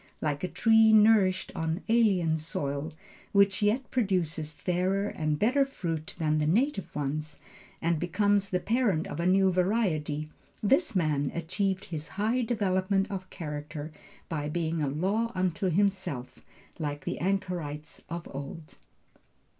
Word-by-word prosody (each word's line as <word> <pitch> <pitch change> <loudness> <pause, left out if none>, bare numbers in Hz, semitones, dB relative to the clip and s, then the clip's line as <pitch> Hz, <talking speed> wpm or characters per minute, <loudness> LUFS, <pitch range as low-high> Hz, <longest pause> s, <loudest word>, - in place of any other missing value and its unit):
Like 145 0 -2
a - - +1
tree 225 +2 +5
nourished 210 -3 +5
on 160 +3 -2
alien 190 -9 +3
soil, 145 -1 -3 0.4
which 200 0 +4
yet 220 +5 +1
produces 175 -10 0
fairer 185 +5 0
and 155 -1 -1
better 255 - +3
fruit 165 - -4
than 155 -1 +1
the 150 - +1
native 220 - 0
ones, 150 +1 -3 0.5
and 165 -1 +1
becomes 200 +3 +1
the 180 - 0
parent 215 -6 +1
of 145 - -6
a 170 - +1
new 190 0 +4
variety, 175 -6 0 0.4
this 270 - +3
man 150 -5 +1
achieved 190 +3 -1
his 160 -2 -5
high 225 +5 +1
development 195 -4 0
of 190 -1 -5
character 150 -1 -6 0.4
by 150 -3 -3
being 165 0 -1
a 145 - +1
law 195 +11 0
unto 185 0 0
himself 190 -8 -1 0.4
like 145 -3 -4
the - - -3
anchorites 170 -5 -3
of 170 0 -5
old. 140 +3 -8
180 Hz, 140 wpm, -29 LUFS, 155-200 Hz, 0.5 s, tree